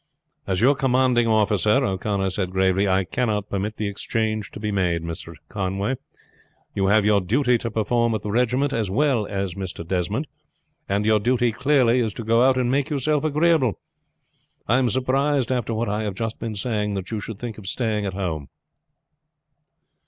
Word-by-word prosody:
"As 95 0 0
your 135 +4 +6
commanding 130 -3 +2
officer," 105 -2 +3
O'Connor 95 0 -1
said 95 -1 -2
gravely, 95 +1 +2
"I 95 0 +2
cannot 105 0 -2
permit 100 +2 -2
the 110 - -2
exchange 110 +1 -2
to - - -10
be 105 0 -2
made, 90 -4 0
Mr. 85 0 -6
Conway. 100 +4 -2 0.8
You 95 -1 0
have 105 +1 +4
your 105 -1 +4
duty 125 +6 +2
to 115 - -3
perform 115 +2 +1
to - - +1
the 105 0 -5
regiment 125 +5 +1
as 110 -5 -1
well 120 -1 +1
as 100 -3 -3
Mr. 90 -3 -6
Desmond, 90 -3 -1 0.6
and 100 +2 0
your 110 0 +4
duty 120 +2 +2
clearly 125 0 +3
is 110 -4 -1
to 115 - -5
go 115 +2 +3
out 130 0 +4
and 125 -1 +1
make 140 +2 +1
yourself 150 +1 0
agreeable. 155 - +2 0.9
I 120 +4 +3
am 125 -2 +2
surprised 135 +1 +1
after 125 -3 -1
what 115 +2 -1
I 105 +1 -1
have 105 -3 -3
just 115 0 -4
been 115 -2 -4
saying 105 -1 -1
that 95 +1 -5
you 110 - -2
should 110 0 -7
think 115 -1 -6
of 100 - -10
staying 110 -2 -1
at 95 - -4
home." 80 -7 -3
110 Hz, 180 wpm, -23 LUFS, 100-125 Hz, 0.9 s, your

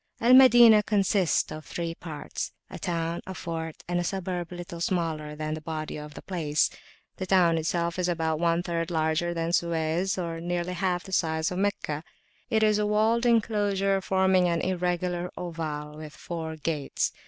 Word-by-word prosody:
Al 240 +2 +5
Madinah 240 -4 +8
consists 200 -3 +1
of 155 - -7
three 170 0 -4
parts, 155 -3 -6 0.2
a - - -7
town, 170 -1 -2
a 190 - -6
fort, 160 -2 -5
and 175 0 0
a - - 0
suburb 180 -1 -3
little 175 -1 -7
smaller 160 -4 -1
than 155 0 -3
the 155 - -5
body 155 0 -4
of 150 0 -8
the - - -9
place. 155 -5 0 0.5
The 185 - -4
town 175 -3 +4
itself 170 +2 -1
is 180 0 +1
about 160 -2 0
one 170 0 +2
third 170 -1 -2
larger 160 +1 0
than 165 0 -1
Suez, 170 +2 0
or 165 -2 -3
nearly 175 +1 -2
half 180 -1 -1
the 190 - -11
size 160 -2 +1
of 180 - -3
Meccah. 160 -6 -1 0.5
It 220 -3 +2
is 215 -1 +3
a 210 - +1
walled 220 +3 +2
enclosure 205 -4 +2
forming 190 -1 +3
an 170 -1 0
irregular 180 -1 -1
oval 155 -3 -5
with 155 -1 -9
four 160 -2 -5
gates. 155 -2 -2
175 Hz, 175 wpm, -27 LUFS, 160-190 Hz, 0.5 s, Madinah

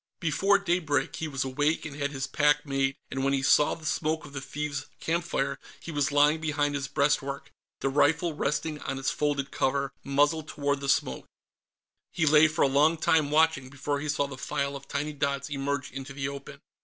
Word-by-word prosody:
Before 190 +5 +3
daybreak, 175 -7 0
he 160 - -3
was 135 -3 -2
awake 145 +5 0
and 150 -3 -6
had 145 0 -1
his 135 -2 -3
pack 145 +1 +2
made, 135 -1 0 0.2
and 135 0 -2
when 135 0 +2
he 135 -1 0
saw 145 +1 +4
the 160 - -13
smoke 155 +1 -1
of 140 - -12
the 135 - -4
thieves' 145 +1 -4
campfire, 165 -4 -1 0.2
he 170 - -8
was 145 -2 0
lying 145 +2 +4
behind 145 -1 0
his 140 -1 -2
breastwork, 140 -1 0 0.3
the 135 - +1
rifle 160 +4 +2
resting 150 +1 -2
on 135 - -4
its 135 0 0
folded 140 -2 -1
cover, 140 +1 0
muzzle 145 +3 +2
toward 145 -2 -2
the 140 0 -4
smoke. - - 0 0.8
He 165 - 0
lay 155 +1 +7
for 155 - 0
a - - +5
long 150 +4 +3
time, 155 -2 +2
watching, 155 -3 +2
before 140 +1 -3
he 150 +1 -4
saw 145 -1 +1
the 135 -2 -8
file 140 +1 -2
of 140 0 -9
tiny 150 +2 -3
dots 140 0 -2
emerge 140 0 -2
into 135 +1 -7
the 135 0 -3
open. 140 -1 -9
145 Hz, 200 wpm, -28 LUFS, 140-155 Hz, 0.8 s, lay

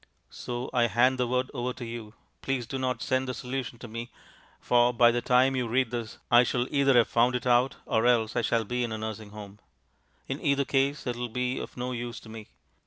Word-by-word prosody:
So 120 +1 -5
I 120 -1 +3
hand 125 +4 +2
the 125 - +1
word 125 +1 -1
over 125 +1 -2
to 120 - -8
you. 115 -1 -8 0.3
Please 135 -3 -2
do 135 +4 -5
not 130 -1 -2
send 130 0 0
the 125 - -3
solution 125 0 -5
to 120 - -9
me, 115 +2 -6 0.5
for 120 0 +3
by 120 0 +5
the 120 0 -1
time 130 +2 +3
you 125 -2 -1
read 125 +1 +1
this 115 -3 -5
I 120 - +8
shall 125 0 0
either 140 -2 +4
have 120 - +5
found 120 +2 +2
it 125 - -3
out 125 +1 +3
or 110 +2 +1
else 115 -2 +2
I 120 - +2
shall 115 0 +1
be 125 +3 -1
in 120 - -3
a 110 - -3
nursing 110 -1 -6
home. 105 -1 -11 0.7
In - - -4
either 140 0 +2
case 140 +2 0
it 125 -2 -2
will 120 0 -3
be 125 +2 -2
of - - -8
no 125 +1 -3
use 120 -1 -5
to 110 - -13
me. 110 -1 -9
120 Hz, 235 wpm, -28 LUFS, 115-125 Hz, 0.7 s, I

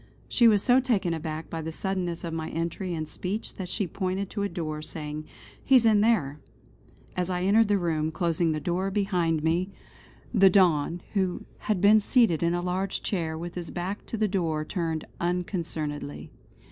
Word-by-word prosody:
She 240 - +5
was 210 -3 +4
so 250 +1 +5
taken 215 -10 +1
aback 160 0 -5
by 165 - -3
the 160 +1 -4
suddenness 180 -1 -2
of 165 -1 -4
my 160 -1 -3
entry 170 +2 -3
and 155 -1 -3
speech 190 +7 -4
that 185 -2 -5
she 200 - 0
pointed 190 +2 -3
to 205 - -3
a 200 - 0
door 155 -3 -4
saying: 155 -1 -5 0.4
"He 270 - +4
is 245 -3 +6
in 215 -2 +5
there." 170 -11 +2 0.8
As 180 0 -1
I 180 -1 -1
entered 215 +3 +4
the 205 0 +3
room, 160 -4 0
closing 165 0 0
the 155 - -1
door 180 +4 -1
behind 180 -6 0
me, 170 +4 +1 0.6
the 195 -4 +7
Don, 175 -3 +3
who 190 -3 -1
had 210 -4 -1
been 210 +2 +7
seated 215 - +3
in 170 0 +2
a 175 - -2
large 185 +2 -2
chair 165 -5 -2
with 170 +1 -6
his 175 -2 -5
back 185 +4 -4
to 230 - -4
the 215 0 +2
door 165 -6 -1
turned 165 -4 -2
unconcernedly. 165 -5 -3
175 Hz, 185 wpm, -27 LUFS, 160-195 Hz, 0.8 s, the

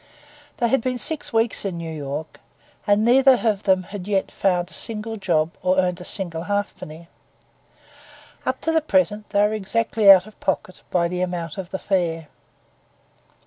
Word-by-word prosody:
They 235 - +1
had 270 0 +2
been 255 +1 -2
six 295 +4 -2
weeks 225 -1 0
in 190 -4 -3
New 165 -1 -5
York, 145 +1 -6 0.5
and 205 +1 +3
neither 260 +1 +5
of 205 -3 +1
them 190 -2 +2
had 195 0 -8
yet 195 -2 0
found 180 -2 0
a - - -14
single 225 0 -4
job 165 -6 0
or 185 0 +1
earned 180 -1 +1
a - - -9
single 170 -4 -3
halfpenny. 180 -5 -4 1.4
Up - - -2
to 325 - 0
the 325 0 +2
present 205 - 0
they 200 - +2
were 210 +1 +2
exactly 215 0 +1
out 190 -1 +9
of 215 - -16
pocket 185 -1 -3
by 170 -1 +1
the 180 +1 -3
amount 175 -2 -3
of 180 -2 -6
the 190 - -3
fare. 165 -6 -1
190 Hz, 175 wpm, -22 LUFS, 175-215 Hz, 1.4 s, out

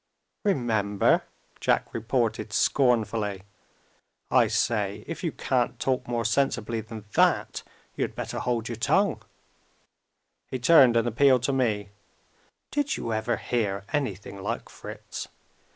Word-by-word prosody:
"Remember?" 110 - +2 0.3
Jack - - +1
reported 115 -1 -1
scornfully. 110 -7 +1 0.9
"I - - +5
say, 105 -2 0
if 165 - -6
you 165 - 0
can't 125 -4 -1
talk 130 -1 -1
more 120 -1 -1
sensibly 115 -2 0
than 110 -1 -9
that, - - +2 0.3
you - - 0
had - - -4
better - - -4
hold 115 -2 -1
your 115 - -5
tongue." 160 - +2 1.3
He 130 - -3
turned 130 -2 +6
and 115 +1 +2
appealed 130 +1 +4
to 140 - +1
me. 110 -6 0 0.8
"Did 290 -1 0
you 115 - -3
ever 110 +2 0
hear 100 -5 -2
anything 100 -8 -3
like - - -4
Fritz? - - -8
115 Hz, 125 wpm, -26 LUFS, 110-130 Hz, 1.3 s, turned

